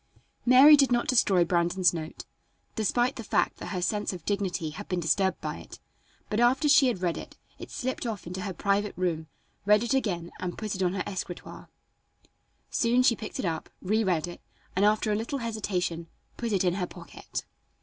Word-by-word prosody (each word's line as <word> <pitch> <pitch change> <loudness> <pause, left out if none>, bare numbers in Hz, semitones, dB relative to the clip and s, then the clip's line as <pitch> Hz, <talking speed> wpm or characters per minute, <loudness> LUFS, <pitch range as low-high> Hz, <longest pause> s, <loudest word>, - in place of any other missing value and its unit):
Mary 265 +5 +9
did 275 -3 +3
not 240 -1 +2
destroy 195 -8 +4
Brandon's 175 +1 +2
note, 160 -1 -6 0.5
despite 240 +4 +1
the 230 - -5
fact - - 0
that - - -7
her 180 -3 -3
sense 210 +2 0
of 180 -4 -9
dignity 190 -6 -1
had 205 +7 -8
been 180 - 0
disturbed 190 +3 +1
by - - -4
it, - - -12 0.5
but 215 - -1
after 250 +5 +3
she 285 -2 +6
had 190 -7 -1
read 170 -2 0
it - - -10 0.3
slipped 255 -1 -3
off 215 -4 -5
into 180 +2 -5
her 195 - -3
private 200 +3 -1
room, 165 -3 -1 0.4
read 210 +2 +4
it 240 - 0
again 180 -10 -1
and 180 -1 -4
put 215 -2 -3
it 190 - -4
on 180 -1 +1
her 190 - -1
escritoire. 185 -3 -7 1.0
Soon 245 +2 +3
she 235 - +4
picked 215 - -7
it - - -2
up, 165 -2 -3
reread 185 -5 +1
it, 175 - -9 0.3
and, 195 +2 +3
after 215 +1 +2
a - - +2
little 225 +6 -2
hesitation, 195 -8 -2 0.3
put 235 -2 -3
it 195 -3 +2
in 180 -2 +2
her 180 -1 -2
pocket. - - -8
200 Hz, 190 wpm, -28 LUFS, 180-230 Hz, 1.0 s, Mary